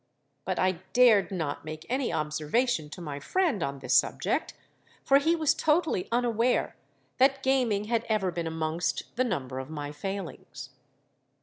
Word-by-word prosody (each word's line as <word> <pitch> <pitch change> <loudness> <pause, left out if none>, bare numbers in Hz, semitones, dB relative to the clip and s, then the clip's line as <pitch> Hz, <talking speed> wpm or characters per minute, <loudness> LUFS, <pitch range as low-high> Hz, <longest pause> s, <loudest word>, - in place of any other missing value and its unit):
But - - -2
I 185 -2 +1
dared 240 -5 +5
not 160 -7 -3
make 155 0 -7
any 260 0 -1
observation 155 - 0
to 175 - -9
my 145 -4 -5
friend 310 - 0
on 140 -3 -2
the 135 - -10
subject; - - +1 0.5
for 275 0 +5
he 325 +4 +2
was 315 -2 +2
totally 315 - +1
unaware 240 0 +1 0.4
that 270 +1 +4
gaming 250 -6 +2
had 230 +1 0
ever 200 -4 +1
been 170 -1 -3
amongst 160 +1 -2
the 255 - +2
number 130 - -3
of 130 +1 -7
my 145 -2 -5
failings. 160 -5 -7
195 Hz, 150 wpm, -28 LUFS, 155-250 Hz, 0.5 s, dared